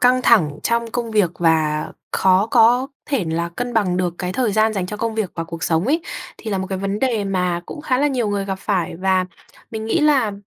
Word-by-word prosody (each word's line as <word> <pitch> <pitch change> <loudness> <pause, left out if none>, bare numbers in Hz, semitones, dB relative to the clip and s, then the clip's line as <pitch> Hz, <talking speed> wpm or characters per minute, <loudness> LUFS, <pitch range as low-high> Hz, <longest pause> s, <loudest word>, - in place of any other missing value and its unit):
căng 250 +1 +4
thẳng 170 -13 +4
trong 235 -1 0
công 235 -1 -3
việc 205 -6 +2
và 155 -2 +2 0.2
khó 190 +2 +3
có 240 +3 +4 0.2
thể 275 -11 0
là 165 +1 -2
cân 245 +8 -5
bằng 190 -5 +2
được 180 -2 -1
cái 180 -1 -3
thời 235 -1 0
gian 215 +1 +3
dành 190 -3 -2
cho 210 - -5
công 225 0 -2
việc 215 -4 -1
và 165 - -3
cuộc 165 0 -8
sống 165 +2 +1
ấy, 315 +5 +2 0.4
thì 220 - -6
là 195 - 0
một 190 - -3
cái 190 -1 -3
vấn 195 +1 -2
đề 235 -6 0
mà 180 -3 0
cũng - - -7
khá 255 -4 0
là 290 - +3
nhiều 245 -6 -1
người 200 -1 -1
gặp 195 -1 -4
phải 185 -5 -1
và 185 0 +1 0.5
mình 220 -1 -5
nghĩ 225 - +1
là 275 -8 +3
205 Hz, 240 wpm, -20 LUFS, 180-235 Hz, 0.5 s, căng